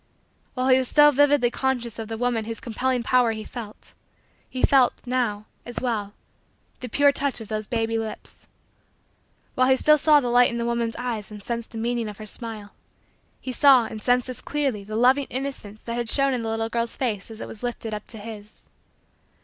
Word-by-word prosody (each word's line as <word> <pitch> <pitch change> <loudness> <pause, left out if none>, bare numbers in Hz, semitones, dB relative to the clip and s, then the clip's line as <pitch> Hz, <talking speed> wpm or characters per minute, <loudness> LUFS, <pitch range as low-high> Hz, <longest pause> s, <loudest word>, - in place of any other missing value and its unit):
While 255 0 0
he 260 0 +6
was 260 - -1
still 295 +2 +6
vividly 285 -3 +3
conscious 245 -4 -2
of 225 - -5
the 225 0 -5
woman 240 -2 0
whose 225 0 -5
compelling 250 +1 -1
power 245 -2 +3
he 215 0 -6
felt, 220 -3 -10 0.6
he 255 - -5
felt, 265 -3 +5
now, 240 -5 -1 0.2
as 240 - -6
well, 215 -5 -2 0.7
the 250 - -6
pure 285 +5 +4
touch 280 -2 -2
of 225 -1 -9
those 215 -1 -3
baby 225 -1 -1
lips. 220 -1 -8 1.1
While 255 0 +3
he 265 - +6
still 300 +3 +4
saw 300 0 +6
the 250 -3 -2
light 245 +1 +5
in 235 - -4
the 235 - -2
woman's 235 -1 -1
eyes 235 -4 -4
and 210 -1 -10
sensed 235 0 -4
the 225 - -9
meaning 235 0 -1
of 205 - -9
her 215 - -8
smile, 215 -2 -7 0.7
he 260 - -5
saw 260 -2 +6
and 220 -1 -7
sensed 245 +2 +3
as 255 - -6
clearly 275 -8 -2
the 215 +2 -7
loving 260 +4 +3
innocence 255 -6 -5
that 235 0 -4
had 240 -1 -2
shown 275 +1 +2
in 250 - -1
the 225 - -3
little 225 0 -2
girl's 235 0 -1
face 220 -6 -2
as 225 -1 -9
it - - -6
was 210 - -10
lifted 235 -2 -4
up 210 -1 -6
to 225 - -10
his. 210 -1 -10
235 Hz, 205 wpm, -24 LUFS, 220-255 Hz, 1.1 s, he